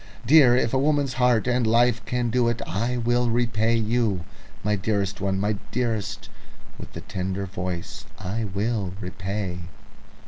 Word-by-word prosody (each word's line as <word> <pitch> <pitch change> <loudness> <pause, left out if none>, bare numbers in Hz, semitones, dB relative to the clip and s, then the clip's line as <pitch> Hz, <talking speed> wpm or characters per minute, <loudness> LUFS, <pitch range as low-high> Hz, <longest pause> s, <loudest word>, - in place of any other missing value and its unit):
Dear, 130 -2 +7
if 115 -1 0
a 130 - +3
woman's 145 -2 +1
heart 125 -3 +3
and 125 -2 +1
life 120 0 +3
can 125 -2 -1
do 125 0 +2
it, 120 0 0
I 115 +7 -1
will 120 +1 +1
repay 115 -1 +1
you. 110 -4 +1 0.4
My 105 0 +1
dearest 100 -1 -1
one, 95 -1 0
my 105 +1 0
dearest 105 -4 -2 0.5
with - - -10
the - - -7
tender 95 -1 -3
voice, 90 -2 -5
I 110 +5 -3
will 100 -1 -2
repay." 95 0 -4
110 Hz, 150 wpm, -25 LUFS, 100-120 Hz, 0.5 s, Dear